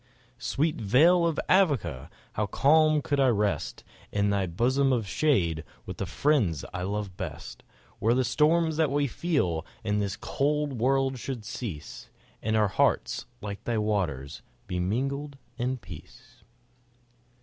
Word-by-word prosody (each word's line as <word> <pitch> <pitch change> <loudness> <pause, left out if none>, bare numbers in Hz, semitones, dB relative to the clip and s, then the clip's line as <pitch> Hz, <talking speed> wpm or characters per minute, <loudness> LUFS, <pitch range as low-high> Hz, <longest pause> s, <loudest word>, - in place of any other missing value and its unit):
Sweet 150 +5 0
vale 165 - +4
of 165 - -1
Avoca! 105 - +2 0.2
how 105 0 -1
calm 155 +4 +4
could 145 -3 0
I 135 - +5
rest 105 -4 0 0.3
In 100 0 +1
thy 100 -2 +1
bosom 130 +10 +2
of 115 -5 0
shade, 90 - +1 0.2
with - - -7
the - - -3
friends 110 - +1
I 90 - -3
love 100 0 -3
best, - - -7 0.4
Where 115 +3 +3
the 130 - +2
storms 155 +5 +2
that 160 -3 +3
we 145 +1 +1
feel 130 - 0 0.2
in 105 -1 0
this 100 -1 -2
cold 145 0 0
world 135 +2 +1
should 120 -3 -5
cease, 100 - -7 0.3
And 110 +1 0
our 105 -2 +3
hearts, 95 - +1
like 100 -1 -6
thy 120 -2 0
waters, 85 -11 -1 0.2
be 90 - -3
mingled 135 +9 -2 0.2
in 130 +2 -1
peace. 120 - -13
120 Hz, 145 wpm, -27 LUFS, 100-145 Hz, 0.4 s, I